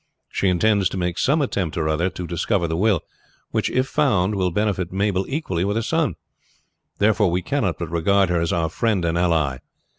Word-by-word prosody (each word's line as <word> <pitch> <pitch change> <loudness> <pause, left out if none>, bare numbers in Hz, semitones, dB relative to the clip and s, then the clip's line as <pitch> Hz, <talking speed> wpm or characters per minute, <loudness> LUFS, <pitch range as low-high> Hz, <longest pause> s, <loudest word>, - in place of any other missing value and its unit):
She 100 - 0
intends 95 +1 +3
to - - -5
make 90 -1 -2
some 145 +3 +2
attempt 95 - -2
or 80 -2 0
other 80 +4 +1
to 90 - -6
discover 85 +2 0
the 80 - -2
will, 100 -1 +2 0.5
which, - - 0
if 130 +1 +1
found, 115 -10 +1
will 95 -2 +1
benefit 95 -1 -1
Mabel 95 0 0
equally 135 - -2
with 100 +2 -1
her 115 - 0
son. 155 - 0 0.8
Therefore 105 -1 +3
we 90 +1 -1
cannot 115 - -1
but 85 -2 -5
regard 95 +3 +2
her 85 -1 +1
as 85 - 0
our 80 -1 0
friend 100 0 0
and 85 0 0
ally. 80 -7 +1
95 Hz, 200 wpm, -22 LUFS, 85-105 Hz, 0.8 s, intends